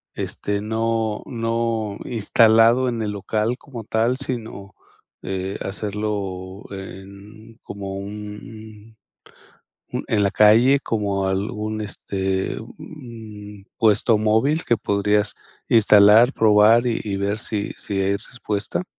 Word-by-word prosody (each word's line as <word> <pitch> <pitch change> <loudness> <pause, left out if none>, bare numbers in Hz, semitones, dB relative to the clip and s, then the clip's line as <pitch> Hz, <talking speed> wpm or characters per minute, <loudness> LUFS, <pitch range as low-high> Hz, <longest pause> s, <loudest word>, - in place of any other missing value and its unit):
este, 100 0 -3
no 110 0 -1
no 115 -3 -2
instalado 115 +2 +4
en 115 -2 -3
el 105 - -2
local 105 +4 -2
como 120 -5 -9
tal, 115 +4 +1
sino, 115 -7 -6 0.5
eh, 95 0 -4
hacerlo 100 -2 -4
en 100 +4 -11
como 100 -1 -6
un 105 +2 -9 1.0
un - - -3
en 105 -2 +2
la 100 - +2
calle, 115 +6 +5
como 100 -5 -1
algún, 105 +3 -3
este 95 -1 -3
un 110 -7 -11
puesto 110 0 +3
móvil 110 +9 +1
que 120 - +2
podrías 105 +1 0 0.3
instalar, 110 +3 +6
probar 110 +2 +5
y 115 - 0
y 100 -2 -2
ver 100 +2 -1
si 105 -2 -3
si 100 -1 -3
hay 95 +1 +1
respuesta. 105 - -4
105 Hz, 115 wpm, -22 LUFS, 100-115 Hz, 1.0 s, instalar